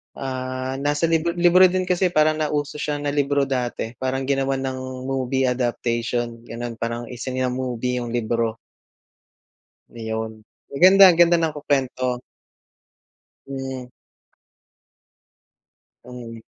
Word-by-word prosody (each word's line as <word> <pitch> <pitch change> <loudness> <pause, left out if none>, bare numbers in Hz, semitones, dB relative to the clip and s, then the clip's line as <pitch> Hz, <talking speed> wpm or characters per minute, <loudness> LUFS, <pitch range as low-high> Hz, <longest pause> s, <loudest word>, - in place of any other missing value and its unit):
Ah, 130 0 -4
nasa 145 +2 -1
libro 165 +1 +1
libro 180 +1 +6
din 185 +1 0
kasi, 180 0 +1
parang 155 -2 +2
nauso 150 -1 -2
siya 150 -1 -1
na 145 - -1
libro 145 0 +1
dati, 125 -4 -2
parang 130 +1 -1
ginawan 135 0 0
ng 130 -1 -5
movie 135 0 -1
adaptation, 120 -1 -1
gano'n, 115 0 -6
parang 115 +1 -3
isina-movie 125 -1 -2
yung 120 -1 -5
libro. 115 -1 -1 1.4
Ayun, 110 -1 -5 0.2
maganda 185 +7 +6
ganda 170 0 +5
ng 160 -2 0
ku 150 - -6
kwento. 130 -3 0 1.3
Hmm. 130 -2 -5 2.2
Hmm. 120 -2 -9
130 Hz, 110 wpm, -22 LUFS, 120-145 Hz, 2.2 s, libro